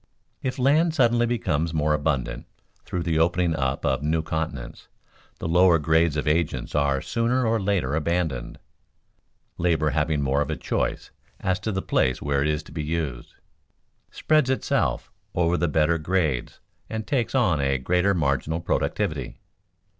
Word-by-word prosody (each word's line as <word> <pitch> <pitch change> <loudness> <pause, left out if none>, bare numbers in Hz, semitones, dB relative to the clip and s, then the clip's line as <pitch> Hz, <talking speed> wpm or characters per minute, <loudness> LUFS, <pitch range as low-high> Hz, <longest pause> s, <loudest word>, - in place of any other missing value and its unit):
_ - - -45 0.4
If 130 - -3
land 155 +5 +3
suddenly 120 -3 +3
becomes 85 -9 -1
more 75 0 +2
abundant 70 -5 -1 0.4
through 90 - -3
the 80 -2 0
opening 85 0 +2
up 65 -1 -1
of 65 0 +1
new 80 +2 0
continents, 80 -7 -5 0.5
the - - -4
lower 90 +1 +5
grades 80 0 +2
of 75 0 -2
agents 80 +1 0
are 70 -2 +1
sooner 120 +2 0
or 115 0 +2
later 95 -9 0
abandoned. 80 -5 -1 1.0
Labor 80 -3 +2
having 75 0 0
more 70 +1 +1
of 75 - -2
a - - -1
choice - - -2 0.3
as 95 +1 0
to 110 - -3
the 95 -1 -2
place 65 - +1
where 70 -1 0
it 70 - +1
is 75 0 -1
to - - -15
be 75 -1 -4
used, 75 -6 -4 0.7
spreads 155 -4 +2
itself 130 - 0 0.2
over 85 0 +2
the 85 0 +1
better 80 +2 +2
grades 80 -6 -1 0.3
and 110 0 -4
takes 135 -3 -1
on 95 - +2
a 70 0 +1
greater 90 +9 +1
marginal 75 +1 0
productivity. 85 - -2
80 Hz, 160 wpm, -24 LUFS, 75-95 Hz, 1.0 s, lower